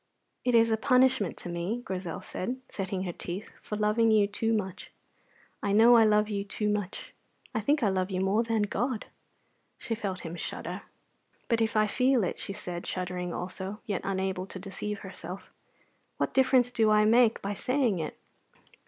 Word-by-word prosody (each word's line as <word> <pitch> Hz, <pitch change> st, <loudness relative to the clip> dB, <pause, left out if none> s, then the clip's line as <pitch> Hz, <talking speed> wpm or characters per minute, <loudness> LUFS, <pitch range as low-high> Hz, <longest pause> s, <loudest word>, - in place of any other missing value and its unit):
"It 245 Hz, -1 st, +2 dB
is 230 Hz, 0 st, +5 dB
a 220 Hz, -, +3 dB
punishment 255 Hz, -4 st, +3 dB
to -, -, -8 dB
me," 175 Hz, +8 st, -3 dB
Grizel 180 Hz, -3 st, -4 dB
said, 250 Hz, +8 st, -4 dB
setting 190 Hz, -1 st, -3 dB
her 180 Hz, -, -3 dB
teeth, 180 Hz, +5 st, -6 dB
"for 210 Hz, -, -5 dB
loving 215 Hz, +2 st, +3 dB
you 215 Hz, -2 st, +5 dB
too 210 Hz, +3 st, -1 dB
much. 195 Hz, -5 st, -2 dB, 0.7 s
I 200 Hz, -, 0 dB
know 230 Hz, +3 st, +7 dB
I 225 Hz, -1 st, +7 dB
love 210 Hz, 0 st, +4 dB
you 200 Hz, -2 st, -2 dB
too 210 Hz, +1 st, -2 dB
much. 205 Hz, -2 st, -3 dB, 0.4 s
I 220 Hz, -, 0 dB
think 285 Hz, +5 st, +2 dB
I 210 Hz, -, +4 dB
love 185 Hz, 0 st, 0 dB
you 185 Hz, -2 st, -2 dB
more 195 Hz, +4 st, +2 dB
than 225 Hz, -2 st, +1 dB
God." 230 Hz, +3 st, -1 dB, 0.7 s
She 230 Hz, -, -3 dB
felt 200 Hz, -5 st, -3 dB
him 165 Hz, -1 st, -6 dB
shudder. 175 Hz, -, -5 dB, 0.7 s
"But 230 Hz, -2 st, +2 dB
if 220 Hz, 0 st, +1 dB
I 215 Hz, -, +5 dB
feel 255 Hz, +2 st, +2 dB
it," 180 Hz, -, -2 dB
she -, -, -5 dB
said, 180 Hz, -3 st, -6 dB
shuddering 180 Hz, -1 st, -3 dB
also, 190 Hz, +4 st, -5 dB
yet 200 Hz, -4 st, -2 dB
unable 190 Hz, -1 st, -2 dB
to 195 Hz, -, -7 dB
deceive 195 Hz, +2 st, -5 dB
herself, 185 Hz, -1 st, -8 dB, 0.6 s
"what -, -, -1 dB
difference 260 Hz, -2 st, +4 dB
do 225 Hz, -3 st, +3 dB
I 210 Hz, 0 st, +5 dB
make 230 Hz, +1 st, +5 dB
by 200 Hz, +1 st, -2 dB
saying 250 Hz, -3 st, +1 dB
it? 155 Hz, -, -4 dB
210 Hz, 180 wpm, -29 LUFS, 190-230 Hz, 0.7 s, know